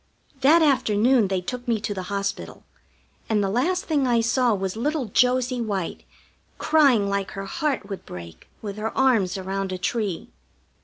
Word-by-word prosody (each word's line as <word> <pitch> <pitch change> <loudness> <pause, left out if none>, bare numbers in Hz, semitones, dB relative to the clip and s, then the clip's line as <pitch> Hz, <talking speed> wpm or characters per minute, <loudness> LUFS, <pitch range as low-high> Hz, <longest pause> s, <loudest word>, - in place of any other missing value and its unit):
That 315 +5 +5
afternoon 245 -4 +3
they 190 -1 -1
took 245 +6 -6
me 230 -2 +1
to 210 - -2
the 190 - -4
hospital, 200 0 -4 0.7
and 210 -2 +2
the 195 - -1
last 350 - 0
thing 290 -5 +1
I 240 -1 +3
saw 240 +2 +2
was 190 0 -3
little 290 +4 -1
Josie 250 +3 +1
White 200 -6 -3 0.5
crying 275 -10 +3
like 200 -1 -1
her 195 0 -5
heart 290 - -2
would 195 -2 -6
break 85 -2 -10 0.2
with 205 -1 -5
her 220 +1 -4
arms 225 -9 +2
around 190 0 -3
a 185 - -3
tree. 200 -2 -3
220 Hz, 165 wpm, -24 LUFS, 195-255 Hz, 0.7 s, That